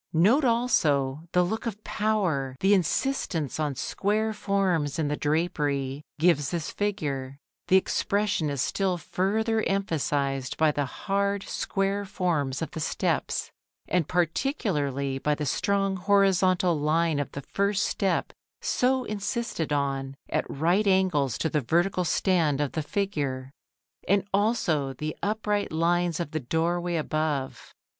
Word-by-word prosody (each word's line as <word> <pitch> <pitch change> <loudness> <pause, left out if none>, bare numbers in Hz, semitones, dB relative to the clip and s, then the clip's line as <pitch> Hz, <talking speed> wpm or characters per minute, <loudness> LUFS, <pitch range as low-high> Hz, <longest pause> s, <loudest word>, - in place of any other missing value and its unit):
Note 210 - +4
also 155 - +1
the 180 - +4
look 220 +6 -2
of 215 -1 -5
power 175 -12 0
the 195 +2 +4
insistence 180 - 0
on 150 -3 -1
square 210 - 0
forms 185 -9 0
in 155 -3 0
the 150 - 0
drapery 145 -3 -1
gives 150 -3 +3
this 165 -1 -3
figure. 140 -10 -2 0.3
The 190 - +6
expression 200 -3 0
is 140 -3 -1
still 190 -2 0
further 220 +6 0
emphasised 145 - -1
by 160 -1 +4
the 145 -1 -1
hard 200 +7 -1
square 195 +1 -1
forms 170 -8 -1
of - - -5
the - - -6
steps, 155 - -1 0.4
and 175 -4 +1
particularly 155 - 0
by 150 +2 +1
the 150 - -3
strong 195 +6 0
horizontal 185 -3 +3
line 155 +1 +1
of 145 - -3
the 140 - -5
first 200 +7 0
step 190 -4 0 0.3
so 255 +1 +1
insisted 210 - -3
on, 135 -1 -1
at - - -1
right 175 +8 +1
angles 185 - +2
to - - 0
the 155 -2 0
vertical 175 +7 +1
stand 165 -4 +2
of 145 -2 0
the 160 - -2
figure; 145 -7 -2 0.6
and 195 0 +3
also 195 - +1
the 155 +4 -4
upright 210 0 -1
lines 170 +1 +1
of 170 -4 -3
the 155 - -1
doorway 170 +5 -1
above. 155 -3 -2
170 Hz, 135 wpm, -27 LUFS, 145-200 Hz, 0.6 s, The